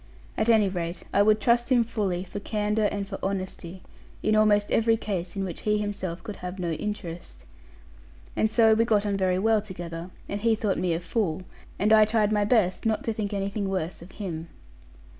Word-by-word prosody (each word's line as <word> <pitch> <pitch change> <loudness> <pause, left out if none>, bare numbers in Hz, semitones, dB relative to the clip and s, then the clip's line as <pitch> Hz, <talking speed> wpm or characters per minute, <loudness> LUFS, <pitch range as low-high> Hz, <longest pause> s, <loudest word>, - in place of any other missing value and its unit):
At 220 +1 0
any 220 -3 +5
rate, 175 -2 -4
I 200 - +5
would 215 +1 +4
trust 240 +3 +2
him 245 -2 +5
fully, 200 -6 -2
for 190 +2 -7
candour 210 +1 0
and 200 -1 -3
for 195 -1 -6
honesty, 190 -2 -4 0.4
in 215 - +3
almost 210 -1 +3
every 225 0 +3
case 190 -5 -4
in 195 - -2
which 180 -4 -5
he 210 0 +1
himself 200 -4 -4
could 210 -3 -7
have 180 +1 -6
no 175 -3 -2
interest. 175 -1 -6 0.9
And 220 - +2
so 220 0 +5
we 225 +1 +3
got 215 -3 +2
on 200 -1 0
very 185 -2 +1
well 220 +2 +3
together; 175 -3 -7 0.2
and 200 0 -4
he 225 0 +3
thought 210 -3 -1
me 180 -2 +1
a - - -2
fool; 180 -2 -2 0.3
and 210 +2 +3
I 215 -1 +7
tried 215 -1 +1
my 210 -1 +2
best 205 -5 +2
not 220 -2 0
to 225 - -1
think 210 -1 -3
anything 200 0 -2
worse 185 -3 -3
of 175 +2 -13
him. 170 -5 -5
205 Hz, 200 wpm, -26 LUFS, 185-215 Hz, 0.9 s, I